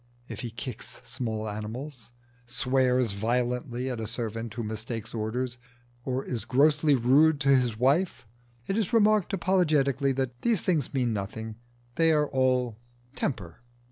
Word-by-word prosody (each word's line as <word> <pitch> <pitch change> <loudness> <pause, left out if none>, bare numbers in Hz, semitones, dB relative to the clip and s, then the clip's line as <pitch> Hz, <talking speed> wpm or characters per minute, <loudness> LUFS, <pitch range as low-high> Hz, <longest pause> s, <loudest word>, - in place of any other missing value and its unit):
If - - -7
he 120 - -4
kicks 115 +1 -7
small 110 -2 -4
animals, 115 +5 -6 0.4
swears 125 -1 +2
violently 120 +4 -1
at 125 -3 -3
a 110 - -3
servant 115 0 -4
who 120 - -3
mistakes 110 +1 -5
orders, 120 +3 -3 0.4
or 130 +1 -2
is 120 -3 -2
grossly 145 +2 +4
rude 140 +5 +4
to 140 - +2
his 125 -4 +1
wife, 140 +7 +1 0.4
it 195 - -1
is 220 -2 -1
remarked 215 -3 +4
apologetically 155 -8 +2
that 125 -2 -3
these 230 -6 +1
things 160 -8 +1
mean 125 -3 +1
nothing 110 +2 -5 0.4
they 165 -1 +4
are 150 -1 +3
all 125 -4 +1 0.3
temper. 95 - -4
125 Hz, 140 wpm, -28 LUFS, 115-145 Hz, 0.4 s, grossly